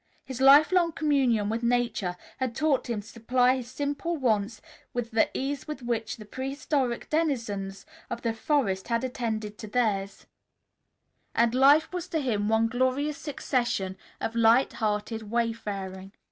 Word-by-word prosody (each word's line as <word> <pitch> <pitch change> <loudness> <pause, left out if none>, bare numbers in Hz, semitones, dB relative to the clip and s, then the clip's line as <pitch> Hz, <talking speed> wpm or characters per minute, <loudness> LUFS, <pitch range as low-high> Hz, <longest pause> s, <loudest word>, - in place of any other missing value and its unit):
His 260 -1 -6
life 280 +4 +7
long 345 -3 +3
communion 265 -9 +2
with 225 +2 -1
Nature 235 -7 0 0.2
had 255 -3 -2
taught 290 -4 +1
him 225 -3 -1
to 205 - -17
supply 250 +3 +2
his 245 -2 -7
simple 290 +5 -2
wants 220 -4 0 0.4
with 240 -1 -2
the 220 0 +3
ease 275 +1 -3
with 300 -4 -6
which 230 -2 -2
the 215 - -10
prehistoric 265 +1 -2
denizens 230 -11 -1 0.2
of 235 - -5
the 230 -1 0
forest 225 -6 0
had 230 0 0
attended 220 -4 -3
to 215 - -7
theirs, 205 -4 -1 1.1
and 235 0 +3
life 290 +6 +5
was 360 -1 -3
to 330 -3 -1
him 215 -7 0
one 225 0 +3
glorious 260 +5 0
succession 240 -9 -1 0.2
of 225 - -3
light 230 +3 +4
hearted 215 0 -2
wayfaring. 205 -5 -3
240 Hz, 150 wpm, -27 LUFS, 220-270 Hz, 1.1 s, life